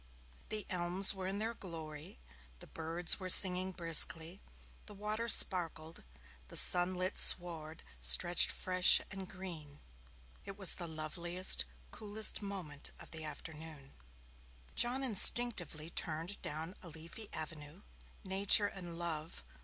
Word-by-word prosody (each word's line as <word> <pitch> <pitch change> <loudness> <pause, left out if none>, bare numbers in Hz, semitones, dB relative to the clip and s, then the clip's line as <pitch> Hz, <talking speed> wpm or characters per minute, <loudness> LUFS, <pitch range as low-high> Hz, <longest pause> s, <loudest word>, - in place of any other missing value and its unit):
The 215 -2 -5
elms 180 +2 +1
were 190 -1 -9
in 195 +1 -6
their 225 +2 -5
glory, 160 - -11 0.4
the - - -13
birds 165 +2 -3
were 185 -1 -8
singing 185 0 +8
briskly, 165 0 0 0.5
the 210 - -12
water 215 +3 -5
sparkled, 165 -6 0 0.4
the - - +1
sunlit 180 +1 +4
sward 165 -3 0 0.2
stretched 70 - +2
fresh 185 0 +2
and 195 -1 -10
green 165 -7 -12 0.6
it 195 0 -12
was 190 -4 +1
the 175 - -7
loveliest, 165 - +1 0.3
coolest 215 +1 -2
moment 185 -8 -10
of - - -16
the 160 -1 -8
afternoon. 155 -1 -12 0.8
John 250 +3 -2
instinctively 200 -8 +2
turned 165 +5 -4
down 160 +4 -8
a 175 - -13
leafy 165 +7 -12
avenue. 155 +3 -11 0.4
Nature 195 +2 +3
and 175 -4 -9
Love! 160 - -6
175 Hz, 120 wpm, -32 LUFS, 160-195 Hz, 0.8 s, singing